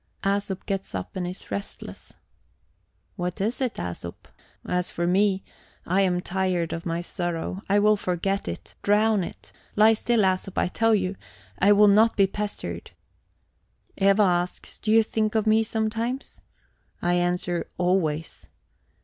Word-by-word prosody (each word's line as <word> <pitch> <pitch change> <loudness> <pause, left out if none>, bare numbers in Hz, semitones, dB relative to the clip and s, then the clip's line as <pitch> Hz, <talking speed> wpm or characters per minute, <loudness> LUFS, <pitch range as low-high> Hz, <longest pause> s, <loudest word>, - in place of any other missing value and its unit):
Æsop 195 -1 -1
gets 195 - -3
up 90 - -5
and 180 -2 -2
is 180 +1 -7
restless. 200 - -7 1.0
"What 180 -1 -3
is 220 +7 -1
it, 255 -3 0
Æsop? 85 0 -5 0.5
As 180 0 0
for 170 - -2
me, 195 +2 +2 0.4
I 185 +3 +2
am 180 -2 +1
tired 180 -2 -1
of 165 +1 -5
my 165 +1 -1
sorrow; 175 +1 -3
I 200 - +4
will 210 +1 +5
forget 195 +1 -1
it, 85 - -6
drown 210 -1 +3
it. - - -9 0.2
Lie 215 +1 +6
still, 230 +1 +1
Æsop, 190 -1 0
I - - +2
tell 225 +3 +3
you; 190 -1 -1 0.4
I 200 +2 +5
will 205 0 +7
not 215 +3 +5
be 200 - +6
pestered. 195 - -5 1.1
Eva 195 +2 +4
asks: 175 -1 -1
'Do 215 - -4
you 225 +1 +6
think 215 0 -1
of 220 -1 +2
me 220 0 +4
sometimes?' 225 +3 -2 0.6
I 175 - +1
answer: 175 0 0
'Always.' 175 -4 -1
195 Hz, 150 wpm, -25 LUFS, 175-210 Hz, 1.1 s, will